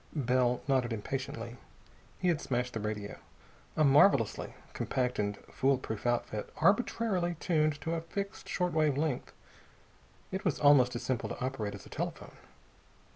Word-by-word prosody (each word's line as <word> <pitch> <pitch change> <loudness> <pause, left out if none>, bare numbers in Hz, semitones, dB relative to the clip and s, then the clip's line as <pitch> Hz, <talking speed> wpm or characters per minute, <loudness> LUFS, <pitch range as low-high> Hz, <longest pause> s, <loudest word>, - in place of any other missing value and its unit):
Bell 125 -3 +2
nodded 130 -3 +2
impatiently. 130 +2 -4 0.6
He 180 - +1
had 160 -3 +1
smashed 125 -1 -1
the 115 - -2
radio, 105 -1 -4 0.6
a 155 - +4
marvelously 140 - +4 0.2
compact 125 -1 -1
and 100 -1 -1 0.2
foolproof 130 -4 0
outfit, 120 -3 -1
arbitrarily 195 -4 +2
tuned 155 -4 +1
to 165 - -2
a 165 - -1
fixed 200 +4 -5
short 180 -1 0
wave 155 -3 +2
length. 150 -4 -1 1.0
It 190 0 -3
was 180 - 0
almost 135 -4 +6
as 120 - -4
simple 130 -3 -1
to - - -6
operate 110 -6 -3
as 100 - -11
a - - -13
telephone. - - -5
135 Hz, 145 wpm, -31 LUFS, 120-160 Hz, 1.0 s, almost